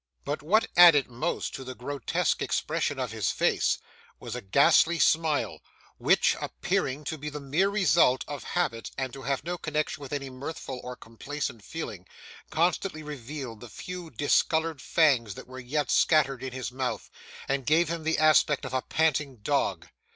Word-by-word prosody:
But 145 - -2
what 205 +9 +3
added 165 -7 +8
most 120 - -2
to 135 - -6
the 130 0 -7
grotesque 135 0 -1
expression - - -1
of - - -3
his - - -1
face - - +1 0.4
was - - -6
a - - -4
ghastly 140 - +4
smile, 160 -2 +1 0.4
which, - - +3
appearing 140 +3 -2
to 155 +1 -4
be 150 +2 -4
the 150 0 -6
mere 150 +8 +1
result 175 -10 +3
of 145 -2 -6
habit 115 -11 -2
and 130 -2 -3
to 135 - -8
have 140 +1 -2
no 175 +2 -4
connection 155 -1 -2
with 140 - -8
any 140 -2 -4
mirthful 130 -1 -6
or 125 0 -6
complacent 115 0 -6
feeling, 100 - -7 0.4
constantly 170 0 0
revealed 135 -4 -7
the 120 - -11
few 180 +3 -7
discoloured 160 0 +1
fangs 125 - +2
that - - -9
were 130 0 -10
yet 145 +4 -2
scattered 140 -5 +3
in 130 - -5
his 130 0 -5
mouth, 130 0 -3 0.4
and 135 -2 -1
gave 160 +3 +4
him 170 -1 -3
the 160 +1 +1
aspect 155 -1 +4
of 130 - -6
a 130 - +1
panting 150 -3 0
dog. - - 0
145 Hz, 170 wpm, -28 LUFS, 130-160 Hz, 0.4 s, added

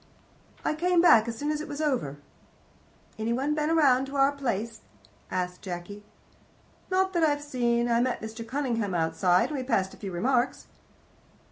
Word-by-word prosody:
"I - - +1
came 350 +3 +2
back 235 -10 +6
as 230 -1 -4
soon 295 +3 -1
as 305 0 -2
it - - -6
was 290 0 -6
over." 255 - -1 1.0
"Any 225 +2 0
one 275 +5 0
been 305 +2 0
round 270 -4 +4
to 275 - -8
our 275 0 +4
place?" 230 -5 -3 0.5
asked 180 0 -3
Jacky. 185 +3 -7 0.9
"Not 380 0 +1
that 340 -2 +1
I've 290 -2 +2
seen. 240 -4 0
I 235 0 +2
met 255 0 0
Mr. 220 +1 -7
Cunningham 230 -7 -1
outside, 175 +2 +2
and 295 -3 -3
we - - -3
passed 200 -7 0
a - - -13
few 195 -2 -6
remarks." 245 +7 0
250 Hz, 170 wpm, -27 LUFS, 210-290 Hz, 1.0 s, back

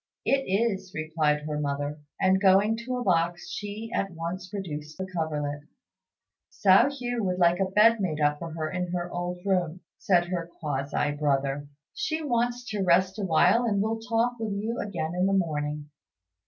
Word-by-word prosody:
"It 270 0 +2
is," 195 -2 0
replied 155 -1 0
her 150 0 -3
mother, 145 +1 -2 0.2
and, 190 0 +3
going 200 +3 +5
to 255 0 -2
a 245 - -2
box, 175 -3 +1
she 210 +2 -5
at 195 - 0
once 175 +2 -5
produced 155 -6 -6
the 190 - -3
coverlet. 150 -5 -3 0.9
"Hsiao 200 +6 +5
hui 245 -4 -3
would 185 -4 0
like 175 0 +4
a 195 - +3
bed 220 +4 +5
made 160 -5 -1
up 150 0 +2
for 165 -1 -6
her 160 -1 -2
in 180 -1 -2
her 175 0 -3
old 175 +1 -4
room," 180 -3 0 0.2
said 175 -2 +2
her 170 -2 -3
(quasi) 145 -1 -1
brother; 145 -1 0 0.3
"she 320 -7 -2
wants 245 -2 0
to 210 -2 -2
rest 185 +2 +3
awhile, 195 +5 +4
and 205 -4 +1
will 220 +2 0
talk 230 +1 0
with 220 -2 -2
you 220 +4 -3
again 175 -5 -3
in 180 +2 +1
the 195 - +1
morning." 150 -5 -1
185 Hz, 175 wpm, -27 LUFS, 155-210 Hz, 0.9 s, going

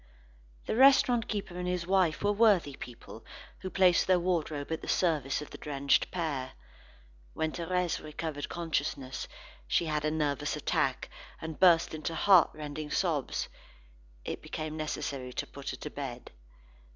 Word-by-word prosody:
The - - -1
restaurant 250 -2 +5
keeper 200 -4 -4
and 180 0 -3
his 180 -1 -1
wife 185 -4 +2
were 205 - +3
worthy 200 -9 +3
people 115 -2 -10 0.4
who 185 - -5
placed 185 -2 +4
their 185 -1 +5
wardrobe 160 -5 -1
at 160 - -2
the - - -8
service 150 -5 +1
of - - -13
the - - -9
drenched 140 -1 +1
pair. 150 -7 -3 0.8
When 160 0 0
Thérèse 180 +1 -1
recovered 150 -1 -5
consciousness, 145 -5 -3 0.4
she 170 - +2
had 150 -1 -1
a 155 - +2
nervous 150 -3 -1
attack, - - 0 0.3
and 160 -1 -6
burst 170 -4 +5
into 155 +1 -4
heartrending 155 -5 +3
sobs. 160 -7 0 0.8
It - - -4
became 155 0 -5
necessary 140 -4 -4
to - - -3
put 140 -1 -8
her - - -4
to 150 - -6
bed. 130 -4 -6
160 Hz, 150 wpm, -30 LUFS, 145-180 Hz, 0.8 s, restaurant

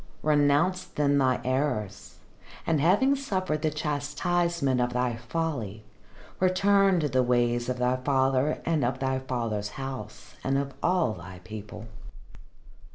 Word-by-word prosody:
"Renounce 150 +4 +3
then 145 -1 +1
thy 130 -2 +2
errors, 125 -7 -2 0.5
and 155 -3 +1
having 205 - +4
suffered 185 - -2
the 155 - +1
chastisement 150 -1 0
of 120 0 0
thy 125 -1 0
folly, 120 - -4 0.6
return 195 0 +3
to 150 - +1
the 130 -1 +2
ways 120 -1 +1
of 125 - -1
thy 125 +1 +1
father 135 +2 +1
and 160 -5 +1
of 125 +2 0
thy 130 0 -1
father's 115 -5 -3
house 120 -3 -7
and 135 +1 +1
of 140 0 -2
all 175 -10 +2
thy 90 0 -10
people." 105 +2 -8
135 Hz, 135 wpm, -27 LUFS, 120-160 Hz, 0.6 s, having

